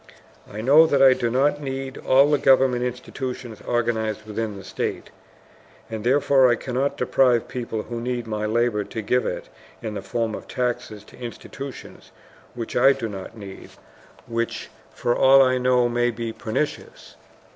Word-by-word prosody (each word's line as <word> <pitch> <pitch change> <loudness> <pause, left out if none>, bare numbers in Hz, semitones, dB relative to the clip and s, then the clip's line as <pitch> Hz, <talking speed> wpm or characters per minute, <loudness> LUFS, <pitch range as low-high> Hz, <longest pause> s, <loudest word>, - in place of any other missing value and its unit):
I 105 - -5
know 145 +7 +6
that 140 -3 +2
I 135 -1 +8
do 120 -2 -1
not 140 +4 +1
need 135 -1 -5
all 135 +3 +4
the 145 - +3
government 130 -2 +4
institutions 125 -2 -5
organized 110 -3 -1
within 110 -1 -4
the 95 - -10
state, - - -4 0.8
and 110 -1 -5
therefore 135 +1 +4
I 120 - +4
cannot 130 +3 -2
deprive 125 -1 +2
people 115 -3 -4
who 120 -1 -6
need 120 -1 -3
my 105 -1 -3
labor 115 -1 +1
to 105 +3 -6
give 125 +5 +1
it - - -4 0.3
in 110 - -5
the 100 - -4
form 110 +3 -2
of - - -7
taxes 120 -4 -3
to - - -17
institutions 130 +3 -9 0.4
which 115 -2 -6
I 135 +3 +6
do 115 - -4
not 100 +1 -8
need, 100 -2 -10 0.6
which 115 0 -3 0.2
for 120 - -1
all 135 +1 +7
I 130 -1 +2
know 125 -1 +3
may 120 0 +1
be 115 -1 -4
pernicious. 115 +8 -4
120 Hz, 165 wpm, -23 LUFS, 110-130 Hz, 0.8 s, I